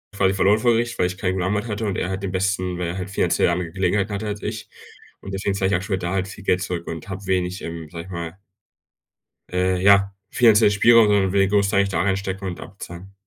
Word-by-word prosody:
quasi 95 -1 +2
verloren 100 +2 +3
vor 120 +2 +3
Gericht, 115 +1 -1
weil 90 - +3
ich 90 0 -6
keinen 95 -2 -1
guten 95 -1 -2
Anwalt 105 +3 -1
hatte 110 0 -3
und 100 -3 -2
er 90 - -2
hat 95 +1 -4
den 95 - -2
besten, 95 -1 -1
weil 90 -1 -2
er 85 - -4
halt 95 0 -5
finanziell 100 - +1
andere 85 -1 -2
Gelegenheiten 95 +2 0
hatte 105 +2 -3
als 105 0 -4
ich. 110 +1 -5 0.5
Und 95 - -9
deswegen 95 0 -1
zahle 95 -1 0
ich - - +3
aktuell 95 +2 -1
da 90 0 -3
halt 95 0 -1
viel 100 - -10
Geld 90 -1 +1
zurück 90 -2 -4
und 80 +3 -7
habe 95 +1 -6
wenig, 90 0 -1
ähm, 80 -1 -6
sage 85 +1 -8
ich - - -13
mal 85 0 -6 1.1
Äh, 90 0 0
ja, 100 0 +5 0.2
finanziellen 110 -3 +5
Spielraum 115 +1 +6
und 105 - +3
irgendwie 95 -1 +3
grossteilig 100 0 +2
da 85 -3 0
reinstecken 95 0 -2
und 90 - -5
abzahlen. 95 0 -10
95 Hz, 235 wpm, -22 LUFS, 90-100 Hz, 1.1 s, Spielraum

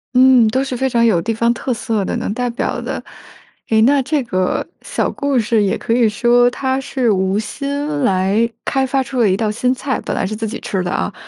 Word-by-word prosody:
嗯， 255 -2 +6
都 260 +5 +1
是 265 -2 -4
非 265 +2 0
常 235 -2 +2
有 195 -7 +3
地 225 +6 -2
方 235 +1 +2
特 255 +2 -4
色 225 -3 -1
的， - - -3
能 - - -3
代 245 +2 -2
表 235 - -3
的。 - - -5 0.7
诶， 220 - +3
那 275 +3 +4
这 280 +2 -1
个 185 -5 -1 0.2
小 - - -2
故 280 -2 -1
事 225 0 +1
也 200 -2 +1
可 230 - -2
以 235 -2 +3
说 240 +2 +3
它 260 +1 -2
是 260 -4 0
无 190 0 +1
心 280 +6 -3 0.2
来 195 +2 +2 0.2
开 270 -1 0
发 270 0 0
出 260 0 -4
了 225 -4 +4
一 190 - +1
道 215 -2 0
新 250 +4 0
菜， 265 +1 -3
本 - - -4
来 - - -1
是 210 +3 -3
自 220 +1 -3
己 215 - -5
吃 190 - -2
的 180 - -3
啊， 195 - -2
235 Hz, 250 characters per minute, -18 LUFS, 210-260 Hz, 0.7 s, 嗯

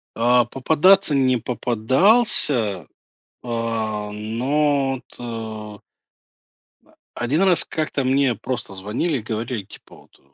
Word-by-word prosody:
А, 120 +1 +3
попадаться 160 +7 +3
не 130 -2 +3
попадался, 125 - +2 0.6
а, 115 -3 -3
но 135 +6 0
вот, 130 - -14
э 110 -3 -7 1.4
А - - -6
1 150 +9 +1
раз 185 -3 +3
как-то 155 -3 -3
мне 130 -2 +2
просто 120 -3 -5
звонили 110 - -2
и - - -8
говорили, 110 0 -4
типа 95 - -15
вот - - -21
120 Hz, 110 wpm, -21 LUFS, 110-140 Hz, 1.4 s, А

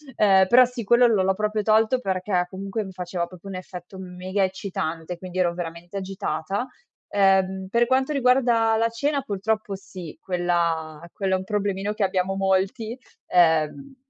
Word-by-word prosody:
ehm, 190 -2 +5
però, 250 +5 +7
sì, 245 -1 -6
quello 240 +4 +5
l'ho 220 -5 +3
l'ho 190 0 +2
proprio 215 +1 -1
tolto 220 +4 +3
perché, 185 -4 -1
comunque, 195 +3 -4
mi 190 - -8
faceva 180 -1 -4
proprio 185 +2 -11
un 185 - -5
effetto 185 +1 -9
mega 185 +2 -3
eccitante, 180 -3 -3
quindi 185 0 -8
ero 175 -2 +2
veramente 175 +2 -6
agitata. 195 +1 -3 0.5
Ehm, 190 -1 +2
per 235 +2 +3
quanto 265 +3 +1
riguarda 245 -4 +3
la 230 +1 +2
cena, 280 +5 -1
purtroppo 210 -1 -2
sì, 185 -4 -10
quella 170 -3 -1
quello 195 -2 -1
è - - +3
un - - -6
problemino 200 0 -2
che 210 - -1
abbiamo 190 0 0
molti, 195 +4 0 0.3
ehm, 175 - +2
195 Hz, 160 wpm, -24 LUFS, 180-220 Hz, 0.5 s, però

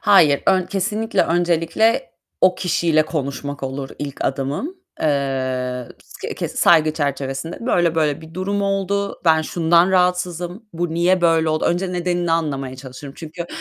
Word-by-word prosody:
Hayır, 160 -9 +5
ön 185 -2 +3
kesinlikle, 210 +4 0
öncelikle 170 +3 +1 0.3
o 185 0 +5
kişiyle 165 -3 +2
konuşmak 140 -2 -4
olur 135 0 -4
ilk 145 -2 -5
adımım. 140 - -2 0.2
Eee, 130 -4 -1
kıs - - -8
ke - - -2
saygı 155 -2 +4
çerçevesinde 140 - -3
"Böyle 175 -8 +2
böyle 155 -2 +1
bir 160 +1 -13
durum 200 +2 -1
oldu. 200 0 -1
Ben 160 -1 +4
şundan 170 +3 +3
rahatsızım. 180 +1 0
Bu 170 0 -2
niye 180 +2 +3
böyle 165 -2 +3
oldu?" 155 0 0
Önce 180 +2 0
nedenini 175 -1 0
anlamaya 140 -5 -1
çalışırım. 135 +1 -10
Çünkü 170 +1 -7
165 Hz, 140 wpm, -20 LUFS, 145-180 Hz, 0.3 s, Hayır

